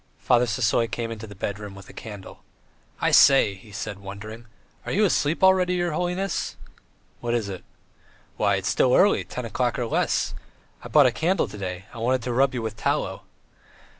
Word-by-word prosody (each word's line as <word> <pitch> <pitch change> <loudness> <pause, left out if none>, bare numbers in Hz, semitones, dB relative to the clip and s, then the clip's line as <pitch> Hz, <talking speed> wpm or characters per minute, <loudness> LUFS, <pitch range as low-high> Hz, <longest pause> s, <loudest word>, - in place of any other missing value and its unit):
Father 125 0 +2
Sisoy 115 -1 +1
came 115 -2 -3
into 110 0 -7
the 100 - -11
bedroom 100 +1 -5
with 100 -1 -12
a - - -13
candle. 105 -4 -10 0.6
"I - - +1
say!" 135 -7 +6
he 100 +2 -15
said, 100 0 -5
wondering, 110 +4 -9 0.4
"are - - -5
you 210 +4 +3
asleep 160 -2 +1
already, 185 -1 +4
your 175 -1 0
holiness?" 180 +4 -2 0.6
"What 120 0 -1
is 115 -4 -1
it?" 95 -2 -7 0.7
"Why, 100 -1 +2
it's 95 -1 -2
still 125 +5 +3
early, 205 +2 +4
ten 125 - -6
o'clock 120 +1 -1
or 120 - -1
less. 115 - 0 0.5
I - - -6
bought 150 -2 +5
a 125 - +4
candle 175 +9 0
to - - -10
day; 90 -1 -5
I - - -8
wanted 125 +1 +1
to 125 0 -2
rub 130 +1 +2
you 120 - -3
with 110 -1 -4
tallow." - - -2
115 Hz, 190 wpm, -24 LUFS, 105-140 Hz, 0.7 s, say